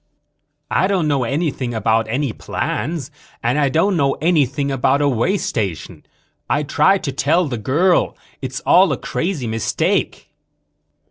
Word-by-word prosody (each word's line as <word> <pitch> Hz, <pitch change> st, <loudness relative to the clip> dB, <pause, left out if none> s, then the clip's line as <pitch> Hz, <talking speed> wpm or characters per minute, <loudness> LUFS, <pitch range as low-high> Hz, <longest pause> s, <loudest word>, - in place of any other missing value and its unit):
"I 185 Hz, -, +2 dB
don't 190 Hz, -5 st, +1 dB
know 140 Hz, -4 st, +1 dB
anything 135 Hz, -3 st, -2 dB
about 110 Hz, +1 st, +1 dB
any 130 Hz, +1 st, -1 dB
plans 150 Hz, 0 st, -3 dB, 0.3 s
and 120 Hz, +5 st, +1 dB
I 140 Hz, -2 st, +2 dB
don't 175 Hz, +8 st, +2 dB
know 140 Hz, -4 st, +2 dB
anything 140 Hz, -4 st, +1 dB
about 135 Hz, +1 st, +2 dB
a 145 Hz, -, +2 dB
way 140 Hz, -, +1 dB
station. 95 Hz, -, -4 dB, 0.5 s
I 145 Hz, -, +1 dB
tried 150 Hz, +7 st, +2 dB
to 140 Hz, -, -2 dB
tell 150 Hz, +6 st, +1 dB
the 120 Hz, -5 st, -4 dB
girl: 165 Hz, -, +1 dB, 0.2 s
it's 130 Hz, -2 st, -5 dB
all 185 Hz, -3 st, +5 dB
a 140 Hz, -, -1 dB
crazy 165 Hz, -7 st, -3 dB
mistake." 110 Hz, -1 st, -1 dB
140 Hz, 145 wpm, -19 LUFS, 125-165 Hz, 0.5 s, all